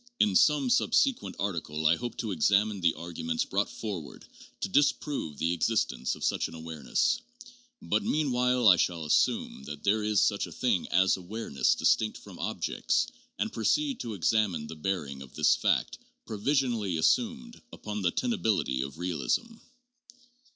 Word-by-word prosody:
In 100 -3 +3
some 150 - +4
subsequent 265 +1 +2
article 80 -6 -3
I 80 +2 +5
hope 120 +4 -6
to 110 -3 -3
examine 100 +4 +2
the 85 -1 +3
arguments 80 -1 -3
brought 100 +2 -1
forward 95 -10 -7 0.4
to - - 0
disprove 140 - 0
the 85 +1 0
existence 75 - 0
of - - -10
such - - 0
an - - -11
awareness, 80 - -1 0.6
but - - +1
mean 155 - 0
while 125 -1 +2
I 90 -3 +8
shall 85 -2 0
assume 75 - +1
that 75 0 -8
there 105 +1 +2
is 105 -1 +2
such - - +1
a - - -11
thing - - 0
as 95 +1 +3
awareness 90 - -1
distinct 95 +7 +1
from - - -13
'objects' - - -1 0.3
and - - -2
proceed 275 - 0
to 115 -3 -5
examine 90 -2 +1
the 80 - -8
bearing 75 -5 -3
of 65 -2 -12
this - - +4
fact, - - 0 0.3
provisionally 115 - 0
assumed, 235 - 0
upon 105 -1 -6
the 90 -3 +2
tenability 110 - 0
of 70 +2 -8
realism. 90 - -2
100 Hz, 155 wpm, -29 LUFS, 80-125 Hz, 0.6 s, I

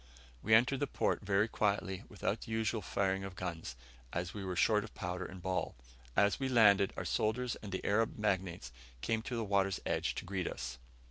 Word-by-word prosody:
We 110 +1 +5
entered 125 +4 +4
the 145 - 0
port - - 0
very 100 +1 +2
quietly, 100 -2 0
without 105 +1 -2
the 115 - -8
usual 110 0 0
firing 95 0 0
of 95 -1 -6
guns, 85 -9 -5 0.4
as 85 0 -3
we 100 - -5
were 95 -1 -3
short 105 +3 +4
of 110 - -11
powder 90 -3 -3
and 90 -1 -9
ball. 95 -2 -1 0.4
As 100 +4 +3
we 135 -1 0
landed, 105 -5 +6
our - - -3
soldiers 120 +3 0
and 105 - -8
the 95 - -3
Arab 110 +3 +2
magnates 95 - -1 0.3
came 110 -1 0
to 120 +2 -4
the 115 - -1
water's 100 -2 +1
edge - - 0
to - - -4
greet 90 -1 -2
us. 65 +1 -5
100 Hz, 200 wpm, -34 LUFS, 95-110 Hz, 0.4 s, landed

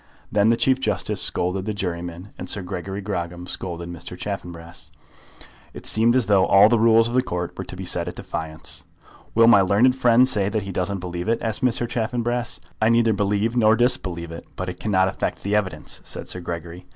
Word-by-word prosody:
Then 105 +1 +3
the 115 - +3
Chief 130 +1 +3
Justice 105 -7 -1
scolded 95 +2 -1
the 105 -1 -3
juryman, 90 -1 -4
and - - -7
Sir 100 - -2
Gregory 95 +2 -5
Grogram 90 -3 -4
scolded 85 -2 -5
Mr. 85 +1 -8
Chaffanbrass. 85 -5 -7 0.8
It - - -9
seemed 115 +2 +3
as 130 -3 +3
though 100 -2 +4
all 100 +2 +7
the 120 -1 +3
rules 115 0 +5
of 120 - -5
the 130 - +4
Court 90 -7 -4
were - - -5
to - - -8
be 95 +1 -6
set 85 -1 -1
at 90 - -5
defiance. 80 -1 -6 0.5
"Will 115 +1 +6
my 115 -4 +7
learned 105 +7 +4
friend 125 -1 +5
say 100 -6 +1
that 105 -1 -2
he 100 - -6
doesn't 95 +1 -2
believe 90 +2 -4
it?" 115 - +3
asked 115 +3 -2
Mr. 120 -1 +1
Chaffanbrass. 120 +1 -2 0.2
"I 110 - +4
neither 115 -1 +4
believe 105 +3 0
nor 110 -2 +5
disbelieve 90 -8 0
it; 85 - -9
but 90 0 -4
it 90 - -7
cannot 95 -3 +2
affect 95 - -3
the 100 +1 0
evidence," 105 -3 -2
said - - -6
Sir 90 - -3
Gregory. 85 +1 -7
100 Hz, 205 wpm, -23 LUFS, 90-115 Hz, 0.8 s, all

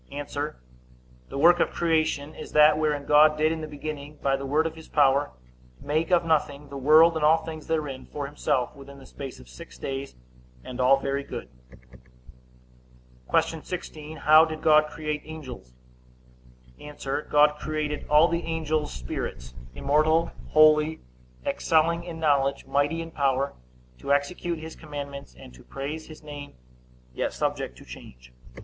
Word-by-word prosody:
A. 145 +1 -4 1.1
The - - -6
work 170 +4 +6
of - - +2
creation 155 -3 0
is - - -10
that 150 0 +7
wherein 150 -2 0
God 150 +1 +5
did 155 +1 +2
in 165 -1 -3
the 155 - -5
beginning, 150 0 -7
by 135 -1 +1
the 135 0 -5
word 150 +4 +2
of 165 - -2
his 160 -1 -12
power, 140 -1 +3 0.5
make 155 +3 -1
of 175 -2 +3
nothing 145 -3 0
the 140 - -9
world, 155 +5 +6
and 160 - -2
all 160 +1 +4
things 155 -2 -8
therein, 150 -5 -3
for 145 -1 -5
himself, 140 -2 -1
within 140 0 -12
the 135 - -14
space 135 0 -9
of 65 - -15
six 60 0 -12
days, 135 - -5 0.5
and 125 0 -5
all 130 +2 +5
very 140 +1 -2
good. 65 - -7 1.8
Q. - - +1
16. 155 0 -7
How 155 +1 +7
did 155 -1 -4
God 155 -1 +5
create 150 -1 -4
angels? 135 - -9 1.1
A. 150 - -10 0.4
God 150 0 +4
created 155 -1 -3
all 150 +3 +6
the 170 0 -1
angels 155 -2 -2
spirits, 65 0 -6 0.2
immortal, 155 - +2 0.2
holy, 155 0 +4 0.4
excelling 165 +2 +1
in 165 -2 -7
knowledge, 140 -3 +1
mighty 145 +4 0
in 165 - -10
power, 140 -2 0 0.5
to 140 - -4
execute 165 +4 0
his 160 +1 -9
commandments, 140 - -8
and 60 - -13
to 60 - -15
praise 145 +4 -6
his 155 -1 -13
name, 145 -1 -9 0.6
yet - - -2
subject - - -3
to - - -14
change. 60 0 -13
150 Hz, 155 wpm, -26 LUFS, 140-155 Hz, 1.8 s, that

